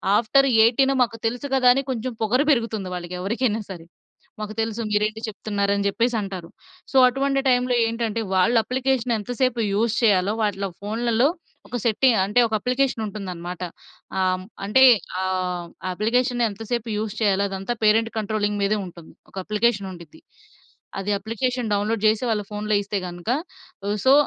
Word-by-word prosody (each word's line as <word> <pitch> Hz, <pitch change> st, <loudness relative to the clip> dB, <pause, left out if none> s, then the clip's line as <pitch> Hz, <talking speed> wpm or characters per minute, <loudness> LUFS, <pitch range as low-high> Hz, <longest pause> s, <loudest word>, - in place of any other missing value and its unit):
After 255 Hz, +6 st, +4 dB, 0.2 s
18 265 Hz, +4 st, +4 dB
మాకు 230 Hz, -1 st, -4 dB
తెలుసు 245 Hz, +5 st, -3 dB
కదా 255 Hz, -1 st, +3 dB
అని 270 Hz, -, 0 dB
కొంచెం 250 Hz, +1 st, -3 dB
పొగరు 240 Hz, +5 st, +2 dB
పెరుగుతుంది 230 Hz, -7 st, -1 dB
వాళ్ళకి 175 Hz, 0 st, -6 dB
ఎవరికైనా 225 Hz, +3 st, 0 dB
సరే. 175 Hz, -4 st, -8 dB, 0.5 s
మాకు 215 Hz, 0 st, -5 dB
తెలుసు 225 Hz, +1 st, -3 dB
మీరేంటి 215 Hz, +1 st, 0 dB
చెప్తున్నారు, 200 Hz, -1 st, -2 dB
అని 200 Hz, 0 st, -1 dB
చెప్పేసి 235 Hz, +4 st, 0 dB
అంటారు. 190 Hz, -4 st, -6 dB, 0.4 s
సో, 270 Hz, -, +2 dB
అటువంటి 275 Hz, +2 st, 0 dB
టైమ్‌లో 250 Hz, 0 st, +2 dB
ఏంటంటే, 230 Hz, -1 st, -2 dB
వాళ్ళు 210 Hz, +6 st, +3 dB
అప్లికేషన్ 255 Hz, -1 st, 0 dB
ఎంత 205 Hz, +3 st, -6 dB
సేపు 255 Hz, -2 st, +2 dB
యూజ్ 225 Hz, +2 st, +1 dB
చేయాలో, 200 Hz, -2 st, +3 dB
వాటిలో 200 Hz, -2 st, -1 dB
ఫోన్‌లలో 230 Hz, +4 st, +1 dB, 0.4 s
ఒక 245 Hz, -, -4 dB
సెట్టింగ్ 235 Hz, 0 st, +3 dB
అంటే, 210 Hz, +5 st, +2 dB
ఒక 220 Hz, -, -8 dB
అప్లికేషన్ 255 Hz, -2 st, 0 dB
ఉంటుందన్నమాట. 180 Hz, -4 st, -6 dB, 0.6 s
ఆ! -, -, +2 dB, 0.2 s
హ్మ్. 185 Hz, -, -10 dB, 0.2 s
అంటే 260 Hz, +6 st, +5 dB, 0.4 s
ఆహ్, 180 Hz, -2 st, -2 dB, 0.3 s
అప్లికేషన్ 245 Hz, +5 st, 0 dB
ఎంత‌సేపు 225 Hz, +3 st, -4 dB
యూజ్ 210 Hz, -1 st, -3 dB
చేయాలో 200 Hz, -2 st, +2 dB
అదంతా 195 Hz, +5 st, -3 dB
పేరెంట్ 225 Hz, +1 st, +3 dB
కంట్రోలింగ్ 210 Hz, -1 st, -1 dB
మీదే 210 Hz, +1 st, +1 dB
ఉంటుంది. 170 Hz, -2 st, -12 dB, 0.2 s
ఒక -, -, -20 dB
అప్లికేషన్ 210 Hz, -2 st, 0 dB
ఉండిద్ది, 180 Hz, -, -13 dB, 0.8 s
అది 195 Hz, +2 st, -2 dB
అప్లికేషన్ 235 Hz, +3 st, -2 dB
డౌన్‌లోడ్ 205 Hz, +2 st, 0 dB
చేసి 215 Hz, +2 st, +2 dB
వాళ్ళ 215 Hz, -2 st, +1 dB
ఫోన్‌లో 210 Hz, 0 st, -1 dB
ఇస్తే 205 Hz, +1 st, -3 dB
గనక, 175 Hz, +3 st, -7 dB, 0.6 s
హ్, 205 Hz, +1 st, 0 dB
సో, 265 Hz, -, +7 dB
215 Hz, 155 wpm, -23 LUFS, 200-240 Hz, 0.8 s, సో